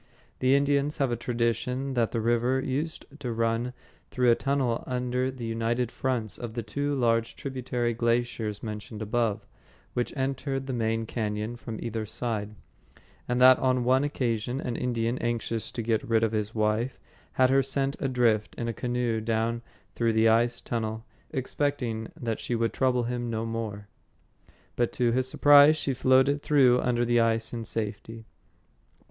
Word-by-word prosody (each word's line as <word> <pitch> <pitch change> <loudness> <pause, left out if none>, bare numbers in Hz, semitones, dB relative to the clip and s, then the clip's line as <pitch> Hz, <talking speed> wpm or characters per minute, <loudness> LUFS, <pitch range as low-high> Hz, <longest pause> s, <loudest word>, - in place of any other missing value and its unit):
The 130 +1 +4
Indians 140 +1 +1
have 135 -3 +1
a - - +1
tradition 120 +3 -1
that 120 -3 +1
the 115 - -2
river 120 +3 +2
used 145 +5 -3
to 125 -4 -3
run 115 +2 0 0.4
through 125 -2 +3
a - - +5
tunnel 135 -4 0
under 125 0 -1
the 130 -3 -6
united 115 +2 -1
fronts 120 -5 -2
of 120 -2 -6
the 120 - -2
two 145 +7 -2
large 115 -3 +1
tributary 125 -3 -2
glaciers 115 -2 -1
mentioned 105 0 -6
above, 110 -1 -1 0.5
which 120 - -1
entered 135 0 -2
the 135 - -3
main 115 -1 0
cañon 110 0 -3
from 115 -2 -7
either 115 -1 -3
side; 105 -2 -3 0.7
and 125 0 0
that 130 0 +8
on 130 -1 +2
one 130 +3 +3
occasion 125 -3 -1
an 125 -4 -3
Indian, 120 0 -1
anxious 115 -1 -2
to 115 - -4
get 110 -1 +1
rid 115 -1 +3
of 110 - +2
his 110 0 -2
wife, 110 +4 0 0.3
had 130 0 +4
her 135 0 +5
sent 135 +1 0
adrift 120 -5 +1
in 120 - -3
a 115 - -2
canoe 120 -2 -1
down 115 +1 -1 0.3
through 115 -1 +1
the 110 +1 +4
ice 115 +1 +3
tunnel, 110 -1 -3 0.2
expecting 130 -4 -2
that 115 -2 -2
she 120 - -2
would 115 0 0
trouble 125 -2 +2
him 120 0 -3
no 115 0 -2
more. 110 -3 -4 0.9
But 120 -1 +1
to 120 -1 +2
his 130 +2 +1
surprise 145 +3 +7
she 140 -3 -1
floated 130 +3 +3
through 130 -5 +4
under 120 -1 +1
the 120 0 +3
ice 115 0 +1
in 115 -1 -4
safety. 110 +1 -4
120 Hz, 165 wpm, -27 LUFS, 115-130 Hz, 0.9 s, that